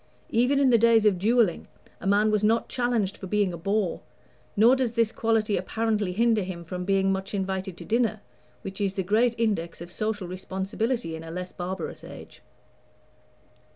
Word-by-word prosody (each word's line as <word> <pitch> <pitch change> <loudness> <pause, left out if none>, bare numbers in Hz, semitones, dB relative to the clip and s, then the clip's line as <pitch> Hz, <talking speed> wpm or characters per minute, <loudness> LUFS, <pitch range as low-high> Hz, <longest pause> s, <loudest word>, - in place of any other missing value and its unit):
Even 250 +5 +3
in 270 -2 +4
the 235 - +5
days 230 -1 +5
of 195 -4 +3
duelling 220 -2 +2 0.3
a - - -5
man 205 +2 +3
was 210 -1 +1
not 225 +2 +2
challenged 235 -6 0
for 190 - -8
being 205 -2 +1
a - - -5
bore, 195 +1 -1 0.6
nor 230 +5 +6
does 255 -3 -1
this 230 -2 +2
quality 225 -2 +1
apparently 215 -4 -1
hinder 225 +2 +2
him 180 -2 -5
from 180 +2 -5
being 195 0 +2
much 195 +1 -3
invited 190 -1 -3
to 170 - -9
dinner, 220 +1 +1 0.4
which 195 +1 -6
is 195 -1 0
the 190 - -1
great 225 +5 +2
index 200 -7 -1
of 170 +1 -9
social 215 -1 -3
responsibility 190 +2 -3
in 160 - -8
a 165 - -9
less 180 +2 -5
barbarous 180 0 -5
age. - - -11
205 Hz, 180 wpm, -26 LUFS, 185-225 Hz, 0.6 s, nor